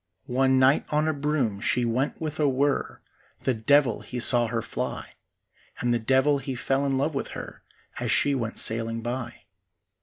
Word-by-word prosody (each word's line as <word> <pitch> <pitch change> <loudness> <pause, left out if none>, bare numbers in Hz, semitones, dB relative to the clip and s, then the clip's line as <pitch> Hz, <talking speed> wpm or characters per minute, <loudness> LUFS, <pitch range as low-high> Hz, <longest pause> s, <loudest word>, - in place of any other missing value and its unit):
One 130 +1 +2
night 130 +2 +4
on 150 +1 +1
a 155 - +1
broom 140 -8 -1
she 125 +2 +1
went 125 +4 -1
with 155 -1 -5
a 150 -2 +3
whirr; 135 +2 -1 0.4
The 130 - +1
devil 130 +1 +2
he 125 - -6
saw 120 0 +4
her 115 0 -3
fly, - - -5 0.7
And 120 0 +1
the 120 - +1
devil 130 +5 +2
he 135 -1 -5
fell 135 +3 0
in 135 -1 0
love 145 +4 0
with 135 - -3
her - - -9 0.4
As - - -1
she 145 - +3
went 115 -4 -3
sailing 115 0 +2
by. 120 0 -5
130 Hz, 180 wpm, -26 LUFS, 120-140 Hz, 0.7 s, night